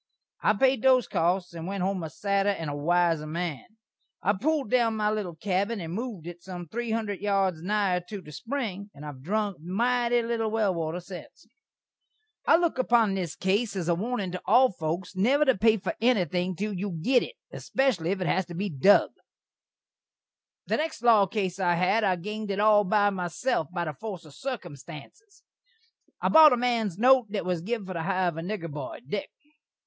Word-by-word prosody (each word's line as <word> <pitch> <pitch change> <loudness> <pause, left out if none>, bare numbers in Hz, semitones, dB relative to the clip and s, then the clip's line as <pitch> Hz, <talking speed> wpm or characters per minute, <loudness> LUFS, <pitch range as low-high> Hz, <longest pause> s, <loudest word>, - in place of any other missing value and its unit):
I - - +3
paid 260 +3 +2
those 260 -2 +4
costs, 175 +2 0
and 165 0 -6
went 195 -1 -3
home 190 -1 -1
a 160 - -5
sadder 200 +4 0
and 165 -7 -2
a - - -4
wiser 165 0 +1
man. 165 -3 -4 0.6
I 200 - +3
pulld 275 +3 -1
down 235 -3 +3
my 210 -1 +1
little 200 -6 -3
kabbin 200 +5 -1
and 165 -1 -5
mooved 220 -7 -5
it 175 0 -9
sum 180 -2 -8
three 235 +7 -4
hundred 220 -3 -2
yards 195 -5 0
nigher 195 -1 0 0.2
the 150 -5 -12
spring, 210 - -4
and 145 +1 -10
I - - -5
hav 135 -3 -11
drunk 205 +4 -1
mity 240 +6 +1
little 225 -2 -1
well 215 -3 +1
water 165 0 -3
sence. 180 0 -11 1.0
I - - +7
look 335 -6 0
upon 235 -5 +3
this 180 -5 -3
case 200 +3 0
as 180 -3 -3
a 175 - +3
warnin' 205 +1 -2
to 180 - -5
all 250 +5 +5
foaks 175 +2 -4
never 265 +10 +3
to 265 -3 +4
pay 220 +3 +3
for 190 -2 -3
enything 185 -6 +1
till 210 +3 -3
you 190 -2 -4
git 255 +3 +4
it, - - -6 0.2
espeshally 255 -12 0
if 190 0 -1
it - - 0
has 190 0 0
to 175 - -8
be 200 +2 -2
dug. 175 +8 +4 1.5
The - - 0
next 310 -6 -3
law 220 -5 +6
case 190 -2 -2
I 175 -2 +2
had 185 +6 +2
I 185 -3 +3
ganed 210 +4 -6
it 195 0 -2
all 210 -1 +5
by 205 +1 +3
myself, 180 - -1
by 175 -1 -2
the 155 - -4
forse 185 +1 -7
of 150 - -14
sirkumstanses. 235 - -9 0.8
I - - 0
bot 315 -3 +8
a - - +1
man's 230 -7 0
note 250 +1 +5
that 200 -2 -3
was 180 -2 -1
giv 220 +2 -3
for 185 - -6
the 170 - -3
hire 185 +1 +1
of 165 - -8
a - - -3
nigger 175 -3 -5
boy, 145 0 -7
Dik. 200 +7 -3
195 Hz, 195 wpm, -27 LUFS, 175-225 Hz, 1.5 s, bot